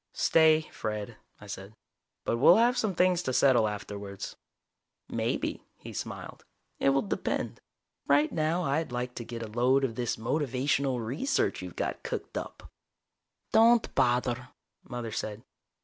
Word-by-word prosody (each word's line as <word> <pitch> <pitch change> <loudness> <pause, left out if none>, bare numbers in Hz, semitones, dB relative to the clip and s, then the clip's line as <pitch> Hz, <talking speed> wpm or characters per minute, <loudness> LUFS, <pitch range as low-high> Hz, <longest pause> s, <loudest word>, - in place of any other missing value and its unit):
"Stay, 160 -1 +5
Fred," 105 +1 -4 0.2
I - - -12
said. 100 +1 -8 0.5
"But 115 - +1
we'll 135 - +8
have 240 +2 +4
some 220 -6 0
things 180 0 +3
to 130 -7 -2
settle 125 -4 +5
afterwards." 100 -1 -6 0.7
"Maybe," - - -2 0.2
he - - -10
smiled. - - -6 0.4
"It - - +3
will 135 0 +2
depend. 100 - -2 0.5
Right 145 +2 +4
now 160 +3 0
I'd 150 0 0
like 125 0 -3
to 120 - -6
get 115 0 -6
a - - -5
load 125 +5 +2
of 130 -4 0
this 120 0 -1
motivational 135 0 0
research 160 - 0
you've - - -8
got - - -3
cooked 470 0 -5
up." - - -6 0.8
"Don't 230 +1 +5
bother," 125 +1 +1 0.4
Mother 120 -2 -5
said. 110 +1 -4
125 Hz, 145 wpm, -29 LUFS, 115-155 Hz, 0.8 s, we'll